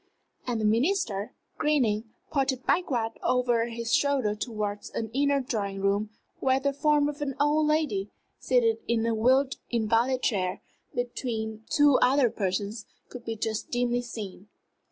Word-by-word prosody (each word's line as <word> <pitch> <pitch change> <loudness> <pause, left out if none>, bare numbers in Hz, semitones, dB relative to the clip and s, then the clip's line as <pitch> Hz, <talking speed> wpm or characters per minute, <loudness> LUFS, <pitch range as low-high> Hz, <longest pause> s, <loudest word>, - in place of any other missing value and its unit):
And 240 -2 -1
the 215 - 0
Minister, 230 - +1 0.2
grinning, 240 -8 +2 0.3
pointed 270 -3 0
backward 245 -11 +1
over 245 -2 +2
his 230 0 -3
shoulder 275 -7 +2
towards 210 -2 -4
an 225 -1 -4
inner 280 +1 +2
drawing 205 -7 -3
room, 200 +2 +1 0.3
where 265 0 +2
the 280 +1 0
form 295 0 +3
of 295 0 -5
an 275 -2 -2
old 300 +1 +3
lady, 295 -11 0 0.3
seated 235 -3 +2
in 230 -1 +1
a 230 - +1
wheeled 260 +5 +3
invalid 235 +3 +1
chair 185 -5 0 0.3
between 225 -3 -3
two 290 -3 +5
other 255 -2 +4
persons, 200 +2 -2 0.2
could 245 -1 -9
be 225 - -3
just 220 0 -3
dimly 245 0 0
seen. 210 -5 -8
240 Hz, 145 wpm, -27 LUFS, 215-275 Hz, 0.3 s, two